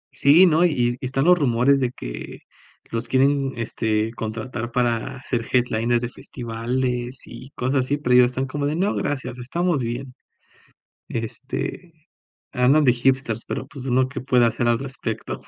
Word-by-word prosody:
Sí, 155 +7 +7
no, 165 0 +4
y 125 -9 +2
y - - -4
están 135 +2 0
los 180 0 +5
rumores 130 +1 +3
de 125 -2 0
que - - -8 0.5
los 115 +1 -2
quieren, 135 +1 +2
este, 110 -1 -1
contratar 115 +1 -5
para 120 +2 0
hacer 125 -3 -2
headliners 120 -1 +1
de 120 - -2
festivales 125 +1 -3
y 130 - -11
cosas 130 +2 +1
así, 140 +3 -1
pero 125 -4 0
ellos 125 0 +7
están 130 +2 -2
como 145 +2 -2
de: 150 - -1
"No, 195 +5 +1
gracias, 130 -3 -3
estamos 165 +4 -1
bien." 125 +3 -4 1.0
Este, 130 +9 -5 0.6
andan 135 +5 +4
de 130 - +6
hipsters, 120 -2 0
pero, - - -4
pues, 135 -3 -9
¿uno 130 0 +2
qué 140 - -5
puede 125 -2 +3
hacer 120 +1 0
al 120 - +3
respecto? 125 -5 -5
125 Hz, 165 wpm, -23 LUFS, 120-135 Hz, 1.0 s, Sí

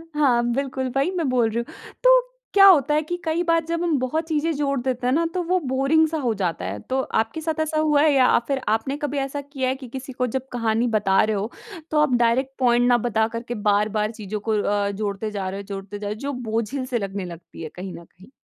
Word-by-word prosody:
हाँ, 260 -5 +3
बिल्कुल, 265 -1 -2
वही 275 +7 +2
मैं 330 -4 0
बोल 245 -3 +2
रही 220 - -4
हूँ। - - -14
तो - - +7 0.3
क्या 395 -1 +8
होता 300 -6 +6
है 305 - +3
कि 315 +3 -4
कई 325 +2 0
बार 330 -1 +2
जब 335 +1 -2
हम 330 -4 +1
बहुत 255 +6 -1
चीज़ें 320 0 0
जोड़ 280 -1 0
देते 250 -1 -2
हैं 250 - +2
ना, 335 +3 +2
तो 365 - 0
वो 365 +2 +1
बोरिंग 275 +2 +2
सा 320 +1 -3
हो 245 -5 0
जाता 165 - -1
है, 100 +3 -4
तो 260 - -2
आपके 225 +4 -1
साथ 320 0 -2
ऐसा 310 0 0
हुआ 300 -2 +3
है 310 0 +5
या 265 -2 +5
अ, - - +4
फिर 275 -1 -1
आपने 225 +6 0
कभी 290 -1 -3
ऐसा 275 +1 -2
किया 275 -2 -3
है 260 - 0
कि 265 -1 -10
किसी 265 +2 -7
को 250 0 -1
जब 265 0 -2
कहानी 230 0 0
बता 195 -2 +3
रहे 215 0 0
हो, 205 +4 -3 0.4
तो 305 - +2
आप 300 -4 +2
डायरेक्ट 240 +3 +2
पॉइंट 245 -1 +3
ना 245 -1 +5
बता 220 -1 +2
करके 230 +1 -5
बार-बार 210 +1 +1
चीज़ों 215 -2 -5
को 215 -1 +2
अ, 205 -1 0
जोड़ते 205 +1 -3
जा 195 -2 -3
रहे 195 +1 -5
हो, - - -6
जोड़ते 200 0 -6
जा 205 - -4
रहे 205 - -2
हो, - - -13
जो 280 +2 -3 0.2
बोझिल 230 +4 -1
से 255 -1 -1
लगने 195 -1 -4
लगती 170 -1 -10
है 155 - -5
कहीं 185 0 -6
न 170 - -10
कहीं? 185 +8 -19
255 Hz, 255 wpm, -23 LUFS, 215-295 Hz, 0.4 s, क्या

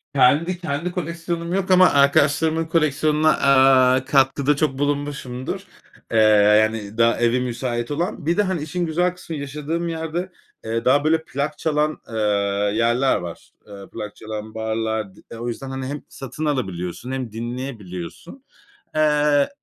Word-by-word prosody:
kendi, 150 +7 +3
kendi 170 0 -3
koleksiyonum 170 0 -4
yok, 190 -1 0
ama 185 0 +7
arkadaşlarımın 145 +3 +3
koleksiyonuna, 155 -1 +2
aaa, 130 -1 +5
katkıda 140 +1 +2
çok 145 -3 0
bulunmuşumdur. 140 -3 -3 0.5
Eee, - - +1 0.5
yani 110 -1 -3
daha 115 0 +3
evi 120 +1 +2
müsait 120 0 -3
olan. 165 +1 -3
Bir 170 +2 +1
de, 210 - +4
hani, 185 -5 -2
işin 175 +3 -2
güzel 175 +2 0
kısmı 170 -2 -8
yaşadığım 150 +4 -3
yerde, 165 +3 -4 0.3
eee, 115 +1 -2
daha, 140 +3 +4
böyle 160 +1 +2
plak 145 0 -3
çalan, 155 -1 0
eee, 115 - -7 0.6
yerler 120 +4 +2
var. 85 -2 -8 0.2
Eee, 100 -1 -11
plak 105 -1 -6
çalan 110 0 -7
barlar. 110 -2 -2
D 115 - -12
o 120 - -4
yüzden, 130 +3 -5
hani, 130 0 -5
hem 145 +2 -5
satın 135 +4 -6
alabiliyorsun, 105 - -3
hem 130 -4 -4
dinleyebiliyorsun. 115 - -7 0.5
Eee, 150 -2 +3
140 Hz, 145 wpm, -22 LUFS, 120-160 Hz, 0.6 s, ama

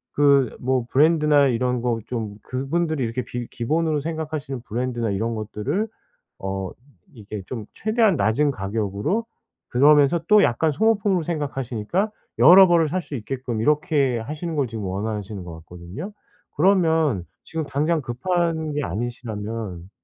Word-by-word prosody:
그 140 -2 +4
뭐 130 -1 0
브랜드나 150 -1 +4
이런 125 0 0
거 120 -2 0
좀 110 -4 -4
그분들이 145 +3 -1
이렇게 115 +2 -2
비 120 -1 -5
기본으로 155 +5 0
생각하시는 155 -4 -4
브랜드나 120 -1 -2
이런 115 +4 -1
것들을 115 - -2 0.5
어 95 -1 -4 0.4
이 120 - -15
이렇게 105 -3 -5
좀 115 -5 -6
최대한 215 -4 +2
낮은 140 +7 +2
가격으로 105 - -2 0.4
그러면서 145 +4 +5
또 210 -1 +6
약간 150 +7 +2
소모품으로 200 0 +2
생각하시니까 145 - -2 0.3
여러 190 +3 +9
벌을 170 -3 +3
살 185 +4 -1
수 150 - -7
있게끔 125 -1 -4
이렇게 150 -3 +2
하시는 155 +7 -5
걸 140 -3 +1
지금 110 -2 -6
원하시는 100 0 -4
것 85 - -8
같거든요. 90 - -8 0.5
그러면 160 - +3 0.2
지금 160 -1 -3
당장 155 +4 0
급한 160 +4 -1
게 145 0 -1
아니시라면 110 -3 -5
135 Hz, 330 characters per minute, -23 LUFS, 115-160 Hz, 0.5 s, 여러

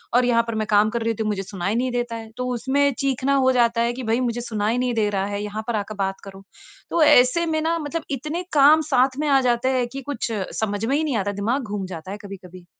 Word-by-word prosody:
और 250 0 +4
यहाँ 235 -1 +3
पर 230 - -3
मैं 215 -1 -2
काम 210 +1 +4
कर 235 +1 -3
रहती 225 -1 -1
हूँ 215 - -1
मुझे 200 -2 -2
सुनाई 195 +1 -3
नहीं 250 +2 0
देता 240 -1 -2
है। 225 -1 -8
तो 250 - -2
उसमें 275 +3 +1
चीखना 275 0 +1
हो 260 -1 +3
जाता 235 -2 +2
है 235 +1 +1
कि 255 +1 -6
भई 225 +1 +1
मुझे 240 -1 -1
सुनाई 220 -1 -1
नहीं 250 -1 0
दे 215 -2 +1
रहा 195 -1 -1
है, 205 0 -3
यहाँ 210 +1 -5
पर 235 - -1
आकर 210 +1 -3
बात 195 0 -1
कारों। 195 0 -10 0.5
तो 340 - +1
ऐसे 255 +4 +5
में 315 -1 -1
न 335 +1 +1
मतलब 310 +2 -4
इतने 300 +6 -3
काम 300 +2 +6
साथ 260 +1 +3
में 305 - 0
आ 270 -1 +4
जाते 240 +2 +1
हैं 245 -1 0
कि 275 - -5
कुछ 235 -3 -3 0.3
समझ 205 0 -1
में 265 +4 +1
ही 315 - 0
नहीं 285 -7 -1
आता 200 -1 -1
है - - -9
दिमाग़ 235 +7 0
घूम 205 -3 -4
जाता 180 0 -8
है 205 - -5
कभी-कभी। 185 -2 -11
235 Hz, 265 wpm, -22 LUFS, 210-265 Hz, 0.5 s, काम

